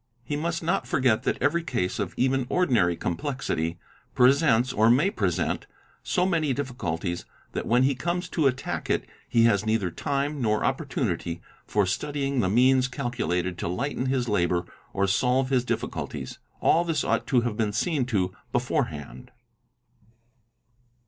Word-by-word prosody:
He 145 Hz, +5 st, -3 dB
must 165 Hz, +3 st, -2 dB
not 160 Hz, -6 st, 0 dB
forget 125 Hz, -3 st, +2 dB
that -, -, +1 dB
every 170 Hz, -, +2 dB
case 120 Hz, -, -2 dB
of -, -, -3 dB
even 130 Hz, 0 st, +1 dB
ordinary 120 Hz, -, +2 dB
complexity 85 Hz, -, -2 dB, 0.4 s
presents 130 Hz, -1 st, +4 dB
or 110 Hz, -1 st, +4 dB
may 140 Hz, +11 st, +4 dB
present 90 Hz, -, -1 dB, 0.3 s
so 180 Hz, -, +1 dB
many 160 Hz, -7 st, +1 dB
difficulties 85 Hz, -, -3 dB, 0.3 s
that -, -, -4 dB
when 125 Hz, +2 st, +4 dB
he 135 Hz, +1 st, +3 dB
comes 175 Hz, +7 st, -2 dB
to. 155 Hz, -5 st, +2 dB
attack 130 Hz, -1 st, -2 dB
it -, -, 0 dB, 0.2 s
he 115 Hz, -, +4 dB
has 105 Hz, -3 st, +4 dB
neither 110 Hz, -5 st, 0 dB
time 140 Hz, -, -2 dB
nor 110 Hz, -2 st, +1 dB
opportunity 115 Hz, -, -2 dB, 0.3 s
for 105 Hz, -2 st, +2 dB
studying 140 Hz, +7 st, -1 dB
the 95 Hz, -, +2 dB
means 130 Hz, +4 st, +4 dB
calculated 120 Hz, -, -2 dB
to -, -, -2 dB
lighten 130 Hz, +8 st, -2 dB
his 130 Hz, -2 st, 0 dB
labour 90 Hz, -4 st, +1 dB, 0.3 s
or 100 Hz, 0 st, +1 dB
solve 125 Hz, +6 st, +1 dB
his 125 Hz, -2 st, +3 dB
difficulties. -, -, -4 dB, 0.2 s
All 170 Hz, -, +4 dB
this 165 Hz, -2 st, 0 dB
ought -, -, 0 dB
to 125 Hz, -3 st, +3 dB
have 120 Hz, -2 st, -2 dB
been 110 Hz, -2 st, 0 dB
seen 130 Hz, -, 0 dB
to 95 Hz, -7 st, 0 dB, 0.2 s
beforehand. 70 Hz, -5 st, -2 dB
125 Hz, 150 wpm, -26 LUFS, 100-140 Hz, 0.4 s, presents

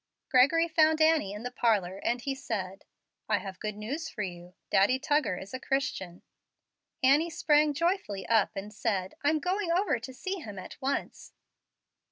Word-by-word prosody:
Gregory 295 Hz, +6 st, +5 dB
found 315 Hz, -1 st, +3 dB
Annie 315 Hz, -10 st, +3 dB
in 210 Hz, +2 st, -7 dB
the 250 Hz, -, -4 dB
parlor, 205 Hz, -7 st, +1 dB
and 240 Hz, +3 st, -1 dB
he 275 Hz, -, -2 dB
said, 200 Hz, -8 st, -5 dB, 0.4 s
"I -, -, +3 dB
have 190 Hz, -2 st, -7 dB
good 215 Hz, -1 st, -4 dB
news 285 Hz, +10 st, -4 dB
for 210 Hz, -, -4 dB
you; 175 Hz, -1 st, -8 dB, 0.2 s
Daddy 205 Hz, +7 st, +4 dB
Tuggar 290 Hz, -, +1 dB
is 195 Hz, +5 st, -9 dB
a 260 Hz, -, -3 dB
Christian." 225 Hz, -10 st, -2 dB, 0.8 s
Annie 290 Hz, +6 st, +5 dB
sprang 300 Hz, -2 st, +3 dB
joyfully 335 Hz, -, -1 dB
up 220 Hz, -2 st, +2 dB
and 200 Hz, +2 st, -6 dB
said, 195 Hz, -4 st, -1 dB
"I'm 300 Hz, +2 st, +3 dB
going 360 Hz, +3 st, -1 dB
over 365 Hz, -, +2 dB
to 250 Hz, +3 st, -8 dB
see 375 Hz, +9 st, -4 dB
him 210 Hz, -, -8 dB
at 185 Hz, -, -8 dB
once." 275 Hz, +1 st, -3 dB
255 Hz, 170 wpm, -29 LUFS, 200-310 Hz, 0.8 s, Gregory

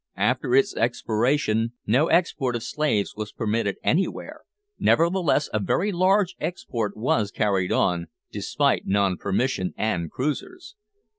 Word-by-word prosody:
After 125 Hz, -, +1 dB
its 135 Hz, -, +3 dB
expiration 115 Hz, 0 st, 0 dB
no 130 Hz, +9 st, +3 dB
export 135 Hz, -8 st, +1 dB
of 115 Hz, -, -3 dB
slaves 140 Hz, -10 st, -1 dB
was 105 Hz, -1 st, -5 dB
permitted 105 Hz, -2 st, -1 dB
anywhere; 185 Hz, +5 st, -1 dB, 0.4 s
nevertheless 170 Hz, -3 st, +2 dB
a 110 Hz, -, +1 dB
very 180 Hz, -, 0 dB
large 190 Hz, +1 st, +2 dB
export 115 Hz, -, -3 dB
was 110 Hz, -2 st, +1 dB
carried 100 Hz, -3 st, 0 dB
on, 85 Hz, -3 st, +1 dB, 0.2 s
despite -, -, 0 dB
non 100 Hz, -1 st, +2 dB
permission 95 Hz, 0 st, -1 dB
and 90 Hz, -7 st, -1 dB
cruisers. 225 Hz, -, -4 dB
115 Hz, 125 wpm, -24 LUFS, 105-155 Hz, 0.4 s, its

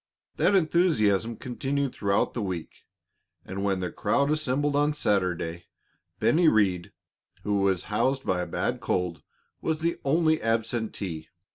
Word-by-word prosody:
That 205 Hz, -, +3 dB
enthusiasm 120 Hz, -, +2 dB
continued 135 Hz, +3 st, -2 dB
throughout 100 Hz, -1 st, 0 dB
the 120 Hz, -, -3 dB
week, 90 Hz, -5 st, -5 dB, 0.6 s
and 95 Hz, +1 st, -5 dB
when 95 Hz, -2 st, 0 dB
the 90 Hz, -2 st, -3 dB
crowd 140 Hz, +1 st, +1 dB
assembled 145 Hz, -1 st, 0 dB
on 145 Hz, +1 st, +2 dB
Saturday, 90 Hz, -, -1 dB, 0.5 s
Bennie 170 Hz, +1 st, +4 dB
Rhead, 95 Hz, -, +2 dB, 0.5 s
who 105 Hz, -1 st, 0 dB
was 95 Hz, -2 st, +1 dB
housed 135 Hz, +5 st, +1 dB
by 90 Hz, -1 st, 0 dB
a 90 Hz, -, -3 dB
bad -, -, -2 dB
cold, 90 Hz, -4 st, -1 dB, 0.4 s
was 160 Hz, -1 st, -1 dB
the 170 Hz, +1 st, 0 dB
only 160 Hz, +2 st, +2 dB
absentee. 110 Hz, -6 st, -2 dB
110 Hz, 135 wpm, -27 LUFS, 95-145 Hz, 0.6 s, Bennie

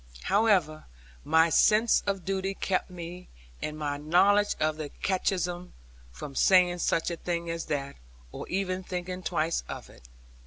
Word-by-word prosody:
However 190 Hz, -7 st, +2 dB, 0.4 s
my 160 Hz, -, +4 dB
sense 215 Hz, +5 st, +4 dB
of 195 Hz, -3 st, -2 dB
duty 195 Hz, 0 st, -2 dB
kept 185 Hz, -1 st, -1 dB
me, 180 Hz, 0 st, -8 dB, 0.3 s
and 150 Hz, 0 st, -4 dB
my 145 Hz, -2 st, -2 dB
knowledge 190 Hz, +7 st, +3 dB
of 155 Hz, 0 st, 0 dB
the 155 Hz, -2 st, -5 dB
catechism, 180 Hz, -1 st, -2 dB, 0.4 s
from 65 Hz, -, -8 dB
saying 180 Hz, +3 st, +4 dB
such 165 Hz, 0 st, 0 dB
a 170 Hz, -, -4 dB
thing 170 Hz, -1 st, -3 dB
as 165 Hz, 0 st, -4 dB
that, 140 Hz, -2 st, -3 dB, 0.3 s
or -, -, -7 dB
even 185 Hz, -1 st, -1 dB
thinking 180 Hz, 0 st, -5 dB
twice 160 Hz, -1 st, -1 dB
of -, -, -7 dB
it. -, -, -18 dB
175 Hz, 150 wpm, -28 LUFS, 155-190 Hz, 0.4 s, my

